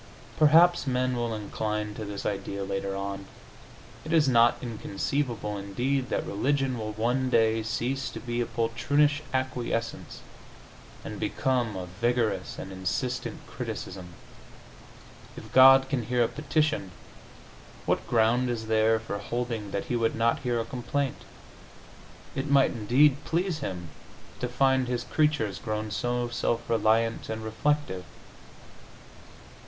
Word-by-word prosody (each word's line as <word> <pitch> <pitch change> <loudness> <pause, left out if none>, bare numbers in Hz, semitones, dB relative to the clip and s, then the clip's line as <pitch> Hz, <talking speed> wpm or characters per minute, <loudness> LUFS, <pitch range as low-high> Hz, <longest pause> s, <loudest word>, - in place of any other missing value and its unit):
Perhaps 165 +2 +6
men 130 0 +1
will 120 -2 -1
incline 105 0 -3
to 110 - -6
this 100 -1 -6
idea 100 -1 -3
later 95 0 -3
on. 100 0 -5 0.8
It 155 - -6
is 160 -3 +4
not 120 -2 +5
inconceivable, 115 -1 -3
indeed, 125 +7 -1
that - - -1
religion 135 +3 0
will 110 -1 -4
one 125 +4 0
day 115 -2 +3
cease 120 +4 -2
to - - -7
be 120 -1 -2
a 120 - -1
poltroonish 140 +6 +1
acquiescence 130 -3 -3 0.8
and - - -6
become 125 -5 0
a 95 -1 -4
vigorous 115 +5 -1
and 95 - -7
insistent 95 +7 -3
criticism. 90 -2 -6 1.2
If 110 - -10
God 135 +1 +8
can 130 -4 -1
hear 125 -1 +2
a - - +2
petition, 150 - 0 1.0
what - - 0
ground 120 +2 +3
is 115 -2 -3
there 110 0 +3
for 100 -2 -5
holding 120 -3 -3
that 100 0 -3
He 125 - -2
would 115 -1 +1
not 115 +3 +2
hear 120 -4 -1
a 115 - -2
complaint? 130 +3 -3 1.1
It 135 +2 -3
might, 140 -1 +5
indeed, 130 +6 +4
please 170 -1 -1
Him 90 - -5 0.5
to 125 - -1
find 130 +1 +2
His 120 -1 -1
creatures 130 - 0
grown 110 +3 -3
so 120 +3 -1
self 120 0 -1
reliant 115 0 +1
and 110 0 -4
reflective. 110 -3 -1
120 Hz, 135 wpm, -27 LUFS, 110-130 Hz, 1.2 s, God